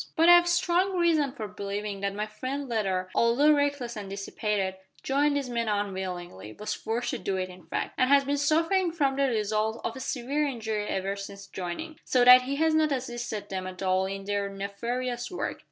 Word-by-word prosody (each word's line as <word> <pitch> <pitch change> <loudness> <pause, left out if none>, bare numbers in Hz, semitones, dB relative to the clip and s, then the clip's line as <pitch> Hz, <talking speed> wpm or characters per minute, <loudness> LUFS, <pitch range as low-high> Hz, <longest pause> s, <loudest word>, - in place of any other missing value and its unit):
"But 330 +2 +5
I - - +11
have 350 0 +5
strong 355 +2 +2
reason 320 -5 +3
for 225 -6 -6
believing 205 0 -4
that 200 0 -2
my 210 +1 -1
friend 255 +6 -5
Leather, 190 -6 -1
although 255 +6 +4
reckless 285 -5 0
and 205 -2 -6
dissipated, 195 -1 -2 0.3
joined 285 +2 +2
these 275 -2 -2
men 235 -2 -2
unwillingly 185 - -4
was 210 - -4
forced 235 +2 -2
to - - -3
do 195 -1 -2
it 185 0 -2
in 180 -2 -14
fact - - -3
and 255 - +3
has 280 0 +6
been 285 +1 0
suffering 330 +5 +2
from 280 -5 +1
the 275 0 +2
result 215 -1 0
of 230 - -3
a - - -7
severe 280 +3 -1
injury 220 -5 -3
ever 195 0 -2
since 200 0 -8
joining, 195 - -6
so 250 -1 +3
that 250 0 +10
he 265 +2 -3
has 320 +2 +2
not 310 -1 +3
assisted 240 -5 -4
them 185 -1 -4
at 185 +1 -7
all 185 0 +2
in 195 0 -5
their 200 0 -1
nefarious 235 +5 -3
work. 360 - -4
230 Hz, 200 wpm, -28 LUFS, 200-280 Hz, 0.3 s, I